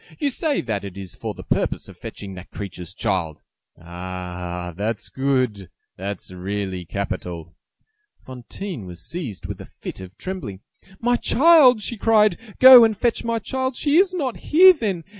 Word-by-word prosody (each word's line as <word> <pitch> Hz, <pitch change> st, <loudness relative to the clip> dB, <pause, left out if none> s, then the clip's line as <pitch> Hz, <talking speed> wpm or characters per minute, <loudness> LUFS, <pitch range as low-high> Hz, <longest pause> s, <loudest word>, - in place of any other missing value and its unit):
You 290 Hz, -3 st, 0 dB
say 295 Hz, +2 st, 0 dB
that 105 Hz, -3 st, -3 dB
it 100 Hz, -1 st, -8 dB
is 95 Hz, -2 st, -8 dB
for -, -, -6 dB
the -, -, -10 dB
purpose -, -, -1 dB
of -, -, -12 dB
fetching 100 Hz, -2 st, -8 dB
that 90 Hz, 0 st, -11 dB
creature's 90 Hz, -3 st, -7 dB
child! 90 Hz, -8 st, -2 dB, 0.4 s
Ah! 90 Hz, 0 st, -6 dB
Ah! -, -, -10 dB
That's 105 Hz, +1 st, -3 dB
good! 130 Hz, -8 st, -1 dB, 0.3 s
That's 100 Hz, 0 st, -6 dB
really 95 Hz, 0 st, -4 dB
capital!" 85 Hz, -3 st, -5 dB, 0.7 s
Fantine 130 Hz, -, -7 dB
was 90 Hz, -1 st, -9 dB
seized 145 Hz, -, -6 dB
with -, -, -6 dB
a -, -, -11 dB
fit -, -, -9 dB
of 95 Hz, 0 st, -11 dB
trembling. 145 Hz, -, -6 dB, 0.4 s
"My 245 Hz, +1 st, +2 dB
child!" 270 Hz, -7 st, +5 dB
she 235 Hz, -, -4 dB
cried, 215 Hz, -1 st, +4 dB
"to 225 Hz, -3 st, -17 dB
go 255 Hz, -2 st, +11 dB
and 220 Hz, -2 st, +2 dB
fetch 235 Hz, +1 st, 0 dB
my 230 Hz, -1 st, -1 dB
child! 260 Hz, +3 st, -3 dB
She 295 Hz, +1 st, +2 dB
is 375 Hz, 0 st, +4 dB
not 280 Hz, -10 st, -3 dB
here, 370 Hz, +4 st, +7 dB
then! 205 Hz, -, -3 dB
115 Hz, 170 wpm, -22 LUFS, -, 0.7 s, go